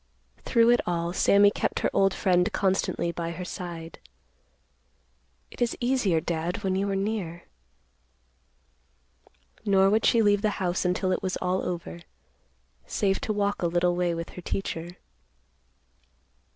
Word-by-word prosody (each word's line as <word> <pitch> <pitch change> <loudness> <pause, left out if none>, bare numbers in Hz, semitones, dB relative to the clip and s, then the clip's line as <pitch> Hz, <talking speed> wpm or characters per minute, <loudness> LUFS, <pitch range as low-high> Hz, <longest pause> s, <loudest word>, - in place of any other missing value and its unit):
Through 230 -1 +4
it 240 - +4
all, 170 0 -1
Sammy 200 +2 +5
kept - - -2
her - - +1
old 195 0 +3
friend 180 +1 +1
constantly 190 -3 0
by 170 -1 -4
her 180 +1 -6
side. 170 -2 -7 1.5
"It - - -13
is 240 -1 0
easier, 240 -9 +1
Dad, 170 +4 -3
when 190 -1 0
you 200 +1 0
are 195 - -1
near." 195 -4 -3 2.2
Nor 195 -1 +4
would 220 +1 +2
she 230 -1 +4
leave 205 -1 +3
the 210 -2 0
house 180 -1 -1
until 185 +1 0
it - - 0
was 185 0 -2
all 185 +1 -1
over, 175 -1 -5 0.9
save 195 -1 0
to - - -2
walk 205 -1 -1
a 175 - +2
little 175 +1 +1
way 175 -1 0
with 165 0 -5
her 180 - -9
teacher. 175 -1 -4
185 Hz, 145 wpm, -26 LUFS, 175-200 Hz, 2.2 s, Sammy